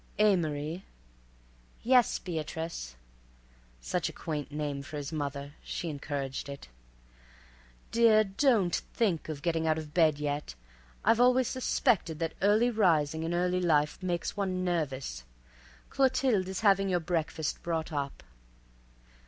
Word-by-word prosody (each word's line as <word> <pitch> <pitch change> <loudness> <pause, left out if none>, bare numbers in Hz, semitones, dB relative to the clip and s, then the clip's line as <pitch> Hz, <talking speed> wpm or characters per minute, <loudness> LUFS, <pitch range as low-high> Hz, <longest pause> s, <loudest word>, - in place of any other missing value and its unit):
"Amory." 170 -4 +1 1.0
"Yes, 250 0 +4
Beatrice." 160 - -5 0.9
(Such - - -1
a - - -7
quaint 150 -2 -5
name 145 -2 -3
for 150 +2 -7
his 145 0 -5
mother; 140 -1 -4
she 170 - -4
encouraged 140 -1 -4
it.) 140 0 -8 1.2
"Dear, 225 -2 +5
don't 205 -3 +2
think 180 -9 -1
of 150 -2 -5
getting 165 -2 0
out 155 0 +2
of 155 -2 -7
bed 160 -4 +4
yet. 145 - -3 0.5
I've 225 +1 +4
always 250 0 +4
suspected 240 - +1
that 165 +1 -2
early 215 +5 +4
rising 160 -8 +2
in 165 +1 -2
early 180 +1 +1
life 150 -4 +2
makes 175 -2 -2
one 185 -2 -1
nervous. 135 - -2 0.7
Clothilde 255 -7 +2
is 190 +1 -4
having 195 -2 +4
your 180 -1 +2
breakfast 160 -2 -2
brought 165 -1 -3
up." 140 - -4
165 Hz, 130 wpm, -30 LUFS, 150-195 Hz, 1.2 s, Dear